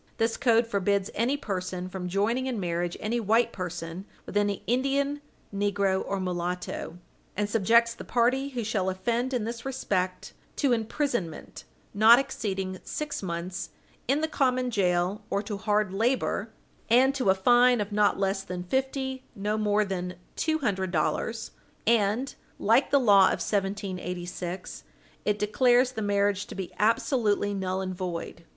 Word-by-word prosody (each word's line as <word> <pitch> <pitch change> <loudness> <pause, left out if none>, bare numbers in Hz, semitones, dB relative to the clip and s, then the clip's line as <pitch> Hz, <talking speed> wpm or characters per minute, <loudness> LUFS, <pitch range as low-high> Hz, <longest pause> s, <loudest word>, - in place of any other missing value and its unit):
This 225 0 +1
code 235 -2 +3
forbids 200 -2 0
any 245 +6 +1
person 185 -6 -4
from 185 -1 -5
joining 225 +7 0
in 245 -4 -2
marriage 175 -1 -2
any 230 +3 -1
white 230 +2 +2
person 175 0 -5 0.2
with - - -9
any 205 -1 +1
Indian, 275 +3 0 0.3
negro, 200 -1 +1
or 195 - -3
mulatto, 180 -2 -3 0.4
and 205 0 +1
subjects 230 +3 +3
the - - -9
party 255 +4 +1
who 245 -4 -3
shall 205 -3 0
offend 235 +7 -1
in 245 -4 -1
this 235 +2 -5
respect 185 -9 -2 0.2
to 280 -4 +1
imprisonment 225 - -3 0.3
not 220 +3 +8
exceeding 190 -7 -3
six 300 -1 -4
months 180 0 -4 0.4
in 280 +4 +2
the 315 - +1
common 255 -4 +1
jail 180 -1 +1
or 200 - 0
to 205 -1 -4
hard 210 -1 0
labor, 225 0 0 0.4
and 255 +4 +5
to 260 -8 0
a 190 - +5
fine 245 +4 +5
of 205 0 -3
not 205 0 +3
less 195 0 0
than 180 -2 -5
fifty 265 +4 -2
nor 210 +1 -1
more 210 0 +2
than 180 -2 -4 0.2
two 315 -1 +1
hundred 195 -10 -1
dollars, 195 +7 -1 0.3
and, 230 +3 +2 0.2
like - - +3
the 280 - +4
law 200 -6 +6
of - - +3
1786, 185 -3 -3 0.4
it 210 -1 +1
declares 245 +4 +3
the 225 - -5
marriage 205 -1 +1
to - - -9
be 190 -2 -5
absolutely 210 -1 +2
null 190 -1 -2
and 185 -1 -3
void. 175 -2 -5
205 Hz, 155 wpm, -27 LUFS, 190-240 Hz, 0.4 s, not